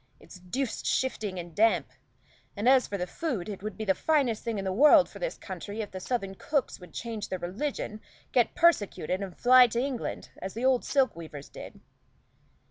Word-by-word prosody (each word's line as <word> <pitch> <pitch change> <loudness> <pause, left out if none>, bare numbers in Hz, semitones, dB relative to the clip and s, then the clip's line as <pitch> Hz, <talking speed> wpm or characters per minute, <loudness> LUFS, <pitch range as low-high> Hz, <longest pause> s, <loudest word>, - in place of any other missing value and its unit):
It's 185 - -14
deuced 230 +8 -3
shifting 215 -7 -1
and 175 -1 -7
damp; 220 +5 +2 0.7
and 210 +4 -1
as 260 -1 +5
for 200 - -3
the 180 - -2
food, 235 - -3
it 200 -3 -6
would 215 0 -6
be 220 - -4
the 195 - +3
finest 270 -4 +1
thing 230 -3 -2
in 195 - -3
the 190 - -1
world 290 - +7
for - - -12
this - - -3
country 205 +2 -7
if 205 - -6
the 185 - -6
southern 195 -2 -2
cooks 280 +6 -2
would 180 - -13
change 225 -3 -5
their 185 - -2
religion, 215 +4 -4 0.3
get 245 -2 +2
persecuted, 205 - +2
and 190 -3 -6
fly 250 0 +7
to 235 0 -2
England, 260 -2 -3
as 190 +2 -6
the 235 +3 -2
old 260 -2 +3
silk 270 -4 +2
weavers 155 -4 -9
did." - - -11
220 Hz, 200 wpm, -28 LUFS, 190-260 Hz, 0.7 s, world